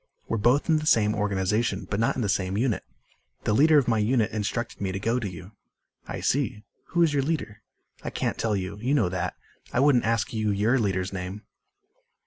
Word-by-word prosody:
"We're 115 - -1
both 120 +7 +3
in 160 -2 +4
the 155 - -4
same 105 -6 +4
organization 105 0 0
but 100 - -2
not 115 - +2
in 125 - -1
the - - 0
same 95 -1 0
unit. 115 -4 0 0.6
The 105 - +1
leader 155 +6 +5
of 140 - +3
my 115 -2 +2
unit 110 +1 +2
instructed 110 +2 -3
me 95 -1 -1
to 95 - -3
go 115 +5 0
to 105 -5 -3
you." 90 +2 -10 0.6
"I - - -5
see. 120 -6 0 0.2
Who 170 -1 +2
is 160 -3 +2
your 140 - +2
leader?" 130 -8 -3 0.4
"I - - -3
can't - - -2
tell 110 -2 +1
you. 95 +1 -4
You 130 +6 +1
know 110 -11 +2
that. 90 0 -3 0.4
I - - 0
wouldn't 135 -3 +4
ask 115 0 0
you 110 -1 0
your 105 +6 +2
leader's 95 -3 -1
name." 95 +3 -5
110 Hz, 210 wpm, -26 LUFS, 100-125 Hz, 0.6 s, leader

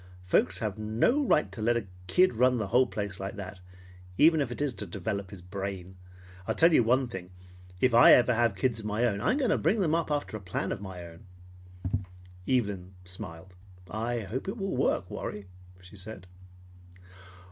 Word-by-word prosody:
Folks 90 0 +3
have 105 0 -3
no 115 - +2
right 155 - +2
to 110 - -7
let 120 +2 +2
a 115 - -3 0.2
kid 180 - +4
run 125 +2 +3
the 105 -4 -3
whole 125 +5 +4
place 100 -2 -4
like 95 +1 -5
that, 100 -1 -8 0.6
even 160 0 +5
if 130 -4 -2
it - - -6
is 145 -3 0
to 100 - -7
develop 100 -3 -4
his 95 -3 -11
brain. 95 -1 -6 0.5
I'll - - 0
tell 165 +1 +6
you - - +6
one 125 +3 +2
thing, 95 -6 -7 0.5
if 130 -2 +3
ever - - +6
I 120 - +9
have 120 - +7
any 120 -3 +2
kids 115 +4 0
of 110 - -8
my 105 +3 +1
own, 100 -4 0
I'm 255 - +2
going 260 -7 +1
to - - +2
bring 185 +9 +2
them 165 -5 +1
up 165 -1 0
after 145 -6 -2
a 110 - -6
plan 95 +1 -3
of - - -4
my 95 -3 -7
own." 85 +3 -13 1.2
Evelyn 100 -7 -1
smiled. 90 0 -8 0.4
"I 115 +2 -2
hope 110 - -5
it 195 - -3
will 195 -2 -2
work, - - +1
Warry," 105 -1 -5 0.4
she 95 +3 -14
said. 95 -1 -8
110 Hz, 200 wpm, -29 LUFS, 95-130 Hz, 1.2 s, I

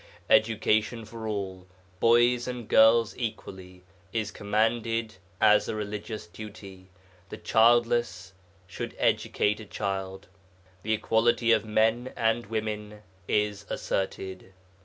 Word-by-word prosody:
Education 110 +1 +2
for 110 0 -8
all, 95 -3 -5 0.3
boys 120 +1 +4
and 125 -3 -5
girls 115 0 +5
equally, 95 -5 -7 0.3
is 110 -1 -2
commanded 110 +2 -1 0.2
as 105 - +4
a - - -2
religious 105 0 -5
duty 95 0 -11 0.4
the - - -7
childless 115 -5 +2 0.3
should 95 - -7
educate 105 +1 +1
a 110 - -9
child. 95 -2 -4 0.5
The 110 +4 -1
equality 115 +2 +2
of 110 -1 +3
men 110 +3 +1
and 115 0 0
women 105 -1 -4 0.2
is 105 -1 -1
asserted. 95 0 -4
110 Hz, 110 wpm, -27 LUFS, 100-115 Hz, 0.5 s, girls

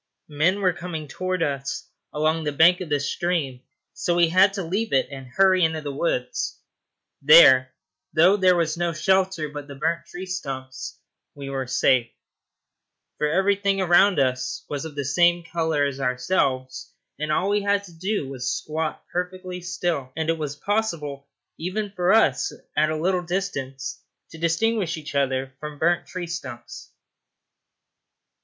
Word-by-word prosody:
Men 175 +7 +2
were 185 -2 +3
coming 165 -3 -6
towards 185 +3 -2
us 140 -2 -3 0.2
along 155 +2 0
the 150 - -1
bank 170 +5 +5
of 175 - -5
the 145 -1 +1
stream, 140 -3 -2 0.3
so 175 - -1
we 170 -1 +4
had 190 +3 +5
to 195 -2 -3
leave 195 +5 -2
it 135 - +3
and 135 -2 -8
hurry 185 +6 +3
into 160 -1 +1
the 145 -2 -5
woods. 135 -4 -2 0.6
There, 135 -4 +7 0.4
though 180 +5 +5
there 185 -3 +4
was 165 -2 0
no 170 -1 0
shelter 190 -1 +1
but 145 -1 -8
the 140 - -9
burnt 165 +4 -2
tree 175 +2 -7
stumps, 135 -8 -6 0.4
we 140 -1 -7
were 135 -1 -3
safe; 125 -1 +2 1.1
for 150 - +2
everything 195 +4 +1
around 185 +1 +4
us 130 -1 -1
was 145 +1 -4
of 155 -2 -8
the 140 -1 -3
same 175 +5 +3
colour 160 -3 0
as 140 -1 -3
ourselves, 130 0 -1 0.3
and 155 0 -2
all 185 +5 +1
we 205 0 +2
had 200 0 +1
to 180 -4 -13
do 185 -2 -2
was 130 -2 -7
to 130 - 0
squat 155 +4 -4
perfectly 180 0 -4
still, 175 -6 -2
and 160 +1 0
it 165 - -2
was 145 -2 -3
impossible 150 -7 -2 0.3
even 195 +5 -3
for 180 -1 +1
us, 215 - +3 0.2
at 155 +1 +3
a 155 - -1
little 180 +2 +1
distance, 145 -8 -4 0.3
to 160 - -11
distinguish 170 +2 0
each 150 -2 -8
other 135 -1 0
from 150 -1 -7
burnt 170 +3 +1
tree 185 -1 -5
stumps. 130 -8 -8
160 Hz, 160 wpm, -24 LUFS, 140-185 Hz, 1.1 s, There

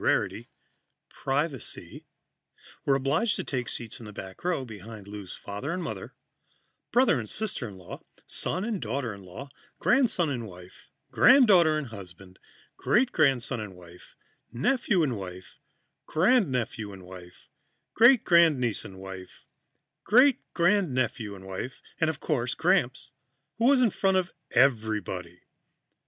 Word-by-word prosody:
rarity - - 0 0.6
privacy 140 -1 -3 0.8
were 135 - +3
obliged 145 - +1
to - - -3
take 125 -3 -3
seats 115 -2 -3
in 115 - -10
the - - -8
back 95 -2 -10
row, 175 -7 -1
behind 110 -2 -10
Lou's 100 -3 -8
father 105 +9 -6
and 180 +1 -3
mother, - - -6 0.8
brother 245 - +4
and 110 -3 -5
sister 200 - -3
in 100 -3 -10
law, 90 -1 -10 0.2
son 185 +3 -1
and 220 -6 -3
daughter 120 0 -3
in 100 - -11
law, 95 +10 -9 0.3
grandson 240 - +2
and 120 -4 -4
wife, 90 -1 -14 0.2
granddaughter 185 - +6
and 145 -5 -4
husband, 95 -3 -12 0.4
great 245 +3 +2
grandson 135 -5 +2
and 105 -3 -7
wife, 90 0 -16 0.4
nephew 190 - +1
and 130 -6 0
wife, 95 -1 -9 0.5
grandnephew 145 - +1
and 95 -1 -11
wife, 90 -1 -13 0.5
great 240 +2 +6
grandniece 155 - +3
and 95 - -10
husband, 95 -1 -8 0.8
great 255 +4 +5 0.2
grandnephew 140 - +1
and 95 0 -12
wife 95 +7 -6 0.2
and, 160 - +2
of 160 - -4
course, 125 -5 -1
Gramps, 160 -7 +1 0.5
who 230 - +2
was 260 -1 +5
in 230 - +3
front 190 0 +1
of 185 -1 -1 0.2
everybody. 105 -8 0
130 Hz, 140 wpm, -27 LUFS, -, 0.8 s, granddaughter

